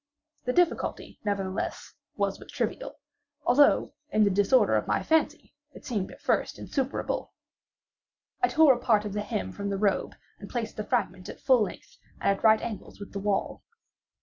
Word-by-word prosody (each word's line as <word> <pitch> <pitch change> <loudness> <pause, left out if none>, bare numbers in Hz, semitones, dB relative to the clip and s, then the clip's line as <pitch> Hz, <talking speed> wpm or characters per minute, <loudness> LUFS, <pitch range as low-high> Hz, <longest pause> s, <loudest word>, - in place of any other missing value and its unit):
The 250 - +1
difficulty, 355 +2 0
nevertheless, 195 -2 -3 0.2
was - - -1
but - - -13
trivial; - - -3 0.5
although, 280 +4 +4 0.2
in 215 -7 +3
the 200 - +3
disorder 205 +7 +4
of - - 0
my - - +1
fancy, 320 0 0 0.2
it - - -12
seemed 210 -7 -2
at - - -13
first - - 0
insuperable. 270 0 -3 1.1
I 370 - +5
tore 315 -5 +6
a 240 - -4
part 215 -4 +2
of 205 - -4
the 210 - -1
hem 95 - -3
from 200 - -4
the 200 - -1
robe 200 -1 0 0.2
and 200 - -10
placed 230 -3 -3
the 215 - -2
fragment 185 -3 -2
at - - -9
full 260 -3 +4
length, 210 - -5 0.2
and 200 - +2
at - - -14
right 220 -1 +6
angles 225 -3 -6
to 200 - -7
the 200 - -7
wall. 200 0 -1
210 Hz, 175 wpm, -28 LUFS, 200-250 Hz, 1.1 s, tore